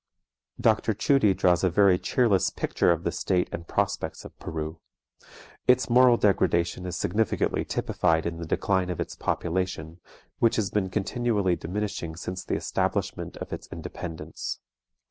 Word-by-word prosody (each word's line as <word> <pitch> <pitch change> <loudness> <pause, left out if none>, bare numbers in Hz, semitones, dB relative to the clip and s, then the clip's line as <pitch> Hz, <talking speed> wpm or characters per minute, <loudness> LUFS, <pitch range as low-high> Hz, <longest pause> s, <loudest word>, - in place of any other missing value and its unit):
Dr. 110 -1 +2
Tschudi 105 -3 +3
draws 90 -1 +3
a 95 - +4
very 95 0 +4
cheerless 115 -7 +2
picture - - +1
of 85 -1 0
the 85 - 0
state 90 0 0
and 85 0 -6
prospects - - -2
of - - -11
Peru. 80 +1 -5 0.9
Its 125 -1 +4
moral 125 0 +6
degradation 90 -3 +1
is 90 - -4
significantly 110 0 0
typified 80 -2 0
in 85 -1 -3
the 85 -1 -6
decline 95 +2 +1
of 90 - -3
its - - -4
population, 85 -2 -2 0.4
which 115 - +3
has 105 -4 0
been 100 -3 0
continually 105 -2 0
diminishing 90 -2 -4
since 90 +2 -5
the - - -2
establishment - - -2
of - - -6
its - - -6
independence. 80 -2 -6
90 Hz, 145 wpm, -27 LUFS, 85-105 Hz, 0.9 s, moral